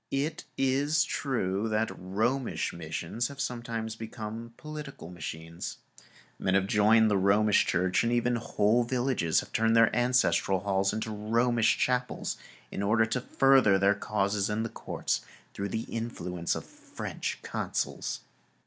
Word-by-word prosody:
It 145 Hz, +3 st, -2 dB
is 140 Hz, +3 st, +2 dB
true 115 Hz, -8 st, -1 dB
that 110 Hz, +1 st, 0 dB
Romish 110 Hz, +8 st, -1 dB
missions 85 Hz, +7 st, -3 dB
have 140 Hz, -1 st, -11 dB
sometimes 115 Hz, -4 st, -3 dB
become 115 Hz, +1 st, -7 dB
political 150 Hz, -, -8 dB
machines. 85 Hz, -1 st, -6 dB, 0.6 s
Men 95 Hz, -, +1 dB
have 95 Hz, -1 st, +3 dB
joined 110 Hz, +2 st, +4 dB
the 100 Hz, -, +3 dB
Romish 100 Hz, +2 st, +4 dB
Church, 90 Hz, +1 st, +2 dB
and 115 Hz, -, +1 dB
even 120 Hz, 0 st, +2 dB
whole 110 Hz, +1 st, +2 dB
villages 120 Hz, -9 st, +1 dB
have -, -, -13 dB
turned 115 Hz, 0 st, +3 dB
their 115 Hz, -1 st, +5 dB
ancestral 120 Hz, -6 st, +2 dB
halls 100 Hz, -1 st, +1 dB
into 110 Hz, +1 st, -3 dB
Romish[Pg 105 Hz, 0 st, -7 dB
170] 115 Hz, 0 st, +3 dB
chapels 125 Hz, -1 st, 0 dB, 0.3 s
in -, -, -3 dB
order 110 Hz, +3 st, +3 dB
to 115 Hz, +3 st, -2 dB
further 130 Hz, -6 st, +4 dB
their 100 Hz, +1 st, +4 dB
causes 100 Hz, 0 st, -1 dB
in 105 Hz, +1 st, -1 dB
the 115 Hz, -, -3 dB
courts -, -, -2 dB, 0.3 s
through 100 Hz, 0 st, -3 dB
the 110 Hz, +4 st, -2 dB
influence 90 Hz, -7 st, -3 dB
of -, -, -5 dB
French -, -, -6 dB
consuls. -, -, -3 dB
110 Hz, 145 wpm, -29 LUFS, 100-120 Hz, 0.6 s, their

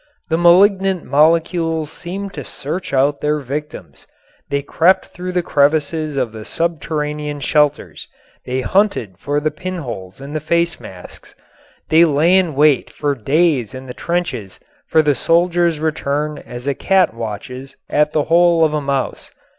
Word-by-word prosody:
The 160 Hz, -, +1 dB
malignant 190 Hz, +1 st, +4 dB
molecules 165 Hz, +1 st, +1 dB
seemed 195 Hz, +3 st, -6 dB
to 145 Hz, -, -6 dB
search 160 Hz, +9 st, -5 dB
out 140 Hz, +2 st, +1 dB
their 150 Hz, 0 st, +1 dB
victims. 150 Hz, +2 st, -7 dB, 0.4 s
They 140 Hz, 0 st, -1 dB
crept 170 Hz, +6 st, +2 dB
through 180 Hz, 0 st, -7 dB
the 180 Hz, -1 st, 0 dB
crevices 150 Hz, 0 st, +1 dB
of 125 Hz, -4 st, -1 dB
the 110 Hz, -1 st, -9 dB
subterranean 150 Hz, -1 st, -3 dB
shelters. 150 Hz, +1 st, 0 dB, 0.4 s
They 130 Hz, +1 st, -2 dB
hunted 125 Hz, -, 0 dB
for 145 Hz, +5 st, -1 dB
the 155 Hz, +1 st, -1 dB
pinholes 145 Hz, -, -7 dB
in 140 Hz, +2 st, -8 dB
the 155 Hz, -, -1 dB
face 170 Hz, +3 st, 0 dB
masks. 90 Hz, -1 st, -13 dB, 0.5 s
They 160 Hz, +2 st, +6 dB
lay 165 Hz, +3 st, +3 dB
in 180 Hz, -6 st, +2 dB
wait 150 Hz, -1 st, +3 dB
for 145 Hz, -1 st, -2 dB
days 135 Hz, -, +1 dB
in 130 Hz, 0 st, -8 dB
the 125 Hz, -, -8 dB
trenches 170 Hz, -, -3 dB, 0.3 s
for 160 Hz, -, +3 dB
the 150 Hz, -1 st, +3 dB
soldiers' 170 Hz, +2 st, +2 dB
return 150 Hz, -1 st, -2 dB
as 120 Hz, +1 st, -8 dB
a 140 Hz, -, 0 dB
cat 190 Hz, -, +2 dB
watches 125 Hz, +4 st, -7 dB
at 150 Hz, 0 st, +1 dB
the 155 Hz, -1 st, +1 dB
hole 170 Hz, 0 st, +4 dB
of 155 Hz, -, -1 dB
a 150 Hz, -, 0 dB
mouse. 140 Hz, -2 st, -3 dB
150 Hz, 155 wpm, -18 LUFS, 140-170 Hz, 0.5 s, They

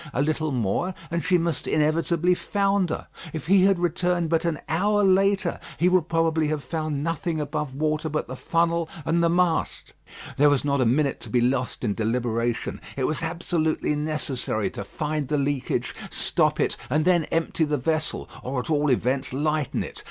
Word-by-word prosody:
A 140 Hz, -, +2 dB
little 155 Hz, 0 st, 0 dB
more, 130 Hz, -, -1 dB, 0.2 s
and 170 Hz, 0 st, -1 dB
she 180 Hz, +1 st, +3 dB
must 170 Hz, -4 st, -1 dB
inevitably 165 Hz, +3 st, +2 dB
founder. 195 Hz, -2 st, 0 dB, 0.3 s
If 155 Hz, -3 st, -5 dB
he 190 Hz, +2 st, +5 dB
had 195 Hz, -1 st, +4 dB
returned 175 Hz, -1 st, 0 dB
but 165 Hz, +1 st, +2 dB
an 165 Hz, -3 st, 0 dB
hour 205 Hz, +5 st, +2 dB
later, 195 Hz, -1 st, +3 dB, 0.2 s
he 180 Hz, -, +3 dB
would 180 Hz, -3 st, +2 dB
probably 165 Hz, -1 st, +2 dB
have 150 Hz, -1 st, -2 dB
found 155 Hz, -3 st, -3 dB
nothing 165 Hz, 0 st, -2 dB
above 150 Hz, -2 st, -3 dB
water 155 Hz, +1 st, 0 dB
but 155 Hz, 0 st, -2 dB
the 130 Hz, -, -6 dB
funnel 170 Hz, +3 st, 0 dB, 0.2 s
and 170 Hz, +1 st, +2 dB
the 170 Hz, -, +4 dB
mast. 175 Hz, -1 st, 0 dB, 0.4 s
There 145 Hz, +2 st, +6 dB
was 145 Hz, -1 st, +1 dB
not 140 Hz, -2 st, +1 dB
a 125 Hz, -, +3 dB
minute 140 Hz, +3 st, +1 dB
to -, -, -9 dB
be 125 Hz, -, +2 dB
lost 125 Hz, +1 st, 0 dB
in 105 Hz, -4 st, +1 dB
deliberation. 115 Hz, +1 st, -1 dB, 0.2 s
It 135 Hz, -, -1 dB
was 155 Hz, +5 st, 0 dB
absolutely 160 Hz, -2 st, -1 dB
necessary 145 Hz, -7 st, -1 dB
to -, -, -6 dB
find 150 Hz, +7 st, -3 dB
the 150 Hz, +2 st, 0 dB
leakage, 140 Hz, -1 st, -1 dB, 0.2 s
stop -, -, +1 dB
it, -, -, +1 dB
and 155 Hz, +4 st, +1 dB
then 175 Hz, -3 st, +4 dB
empty 165 Hz, 0 st, 0 dB
the 150 Hz, -1 st, 0 dB
vessel, 155 Hz, +4 st, -1 dB
or 130 Hz, +1 st, -3 dB
at 125 Hz, -, -4 dB
all 150 Hz, -1 st, +2 dB
events, 130 Hz, +2 st, +1 dB
lighten 150 Hz, +1 st, 0 dB
it. -, -, -8 dB
155 Hz, 180 wpm, -25 LUFS, 140-170 Hz, 0.4 s, There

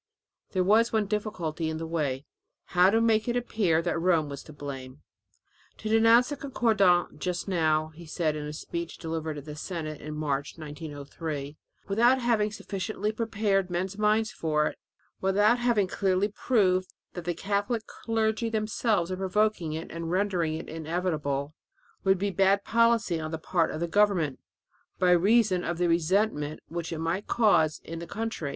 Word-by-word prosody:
There 185 Hz, -1 st, +2 dB
was 220 Hz, +5 st, +4 dB
one 220 Hz, -2 st, +1 dB
difficulty 185 Hz, -6 st, -2 dB
in 160 Hz, -, -3 dB
the 165 Hz, -, -4 dB
way 150 Hz, -4 st, -2 dB, 0.5 s
how 180 Hz, +1 st, +6 dB
to 225 Hz, +3 st, +3 dB
make 225 Hz, -1 st, +2 dB
it 240 Hz, -, 0 dB
appear 200 Hz, -9 st, +1 dB
that 175 Hz, -1 st, -1 dB
Rome 165 Hz, -4 st, +2 dB
was 140 Hz, -1 st, -6 dB
to -, -, -11 dB
blame. 140 Hz, -2 st, -8 dB, 0.7 s
"To 215 Hz, -, -5 dB
denounce 225 Hz, +2 st, +5 dB
the 290 Hz, -, -4 dB
concordat 200 Hz, -, +2 dB
just 180 Hz, +2 st, -3 dB
now," 155 Hz, -4 st, +1 dB
he 160 Hz, +1 st, -13 dB
said 155 Hz, -1 st, -1 dB
in 150 Hz, -1 st, -4 dB
a -, -, -5 dB
speech 170 Hz, +2 st, -5 dB
delivered 160 Hz, -2 st, -4 dB
in 145 Hz, -, -7 dB
the 150 Hz, 0 st, -8 dB
Senate 155 Hz, -2 st, -5 dB
in 155 Hz, +1 st, -6 dB
March, 145 Hz, -1 st, -2 dB
1903, 150 Hz, -1 st, -6 dB, 0.3 s
"without 235 Hz, +6 st, +4 dB
having 225 Hz, -4 st, +1 dB
sufficiently 210 Hz, 0 st, -3 dB
prepared 210 Hz, -4 st, 0 dB
men's 180 Hz, +2 st, -2 dB
minds 215 Hz, +2 st, +2 dB
for 155 Hz, -7 st, 0 dB
it, -, -, -4 dB, 0.4 s
without 205 Hz, +5 st, +3 dB
having 240 Hz, -5 st, +2 dB
clearly 190 Hz, +1 st, +1 dB
proved 190 Hz, -5 st, +1 dB, 0.2 s
that 175 Hz, -2 st, -7 dB
the 175 Hz, -1 st, -1 dB
Catholic 205 Hz, +4 st, -1 dB
clergy 225 Hz, 0 st, -1 dB
themselves 215 Hz, -4 st, 0 dB
are 185 Hz, -, -2 dB
provoking 190 Hz, -3 st, 0 dB
it 160 Hz, +1 st, -6 dB
and 165 Hz, 0 st, -5 dB
rendering 180 Hz, -4 st, 0 dB
it 160 Hz, -, -6 dB
inevitable, 155 Hz, -3 st, -2 dB, 0.5 s
would 190 Hz, 0 st, +4 dB
be 200 Hz, +2 st, -1 dB
bad 195 Hz, +1 st, +3 dB
policy 230 Hz, -6 st, +2 dB
on 155 Hz, 0 st, -4 dB
the 160 Hz, -, -3 dB
part 165 Hz, +1 st, 0 dB
of 155 Hz, -, -4 dB
the 170 Hz, -, -1 dB
government, 180 Hz, -7 st, +2 dB, 0.6 s
by 180 Hz, -1 st, +3 dB
reason 190 Hz, +1 st, +4 dB
of 170 Hz, 0 st, -2 dB
the 175 Hz, 0 st, +2 dB
resentment 165 Hz, -2 st, +1 dB
which 170 Hz, 0 st, -4 dB
might 165 Hz, +5 st, -2 dB
be -, -, -1 dB
caused 170 Hz, -10 st, +3 dB
in 165 Hz, 0 st, -6 dB
the 170 Hz, -, -7 dB
country. 220 Hz, -7 st, -3 dB
180 Hz, 170 wpm, -28 LUFS, 160-215 Hz, 0.7 s, how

